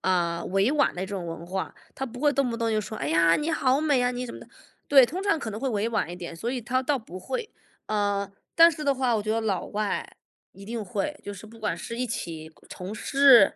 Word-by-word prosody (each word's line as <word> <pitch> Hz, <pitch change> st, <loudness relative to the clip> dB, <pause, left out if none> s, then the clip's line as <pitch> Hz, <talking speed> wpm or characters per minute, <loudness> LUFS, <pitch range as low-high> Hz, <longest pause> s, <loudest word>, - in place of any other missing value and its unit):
呃， 170 Hz, -2 st, +1 dB
委 195 Hz, +5 st, +2 dB
婉 295 Hz, -1 st, +2 dB
的 180 Hz, -, -4 dB
这 190 Hz, -, -3 dB
种 190 Hz, -4 st, -4 dB
文 165 Hz, 0 st, -6 dB
化， 190 Hz, +1 st, -3 dB, 0.2 s
他 270 Hz, -, -3 dB
不 245 Hz, +1 st, -9 dB
会 295 Hz, 0 st, +4 dB
动 275 Hz, -3 st, +1 dB
不 230 Hz, -, -3 dB
动 230 Hz, -1 st, 0 dB
就 215 Hz, -1 st, +2 dB
说， 215 Hz, +1 st, -6 dB
哎 145 Hz, -, -2 dB
呀， 165 Hz, +1 st, +5 dB
你 300 Hz, +2 st, -1 dB
好 270 Hz, -3 st, +2 dB
美 290 Hz, -4 st, +3 dB
啊， 245 Hz, -, +2 dB
你 250 Hz, 0 st, -3 dB
什 -, -, -7 dB
么 -, -, -8 dB
的， -, -, -13 dB, 0.4 s
对， 270 Hz, -3 st, +8 dB
通 365 Hz, +8 st, -4 dB
常 405 Hz, -6 st, +2 dB
可 220 Hz, -, -4 dB
能 215 Hz, -, -5 dB
会 275 Hz, -, 0 dB
委 220 Hz, -1 st, 0 dB
婉 225 Hz, -7 st, 0 dB
一 -, -, -5 dB
点， 175 Hz, -2 st, -7 dB
所 225 Hz, +9 st, -3 dB
以 255 Hz, -1 st, -2 dB
他 255 Hz, +3 st, 0 dB
倒 280 Hz, +2 st, +1 dB
不 185 Hz, -6 st, -9 dB
会。 470 Hz, -, -4 dB, 0.4 s
呃， 205 Hz, -2 st, 0 dB, 0.2 s
但 335 Hz, 0 st, +8 dB
是 305 Hz, -2 st, -6 dB
的 280 Hz, -1 st, +3 dB
话， 255 Hz, -2 st, +1 dB
我 210 Hz, -, -1 dB
觉 215 Hz, -, -2 dB
得 225 Hz, -, +1 dB
老 210 Hz, -4 st, -1 dB
外 210 Hz, 0 st, -2 dB, 0.4 s
一 195 Hz, -, -12 dB
定 225 Hz, +1 st, -4 dB
会， 210 Hz, +10 st, -3 dB
就 205 Hz, -, -5 dB
是 200 Hz, +3 st, -11 dB
不 225 Hz, +1 st, -14 dB
管 210 Hz, -6 st, -1 dB
是 230 Hz, +7 st, -6 dB
一 250 Hz, +1 st, -1 dB
起 160 Hz, -7 st, -5 dB, 0.2 s
从 185 Hz, +4 st, -6 dB
事， 270 Hz, -3 st, +6 dB
225 Hz, 285 characters per minute, -26 LUFS, 195-265 Hz, 0.4 s, 对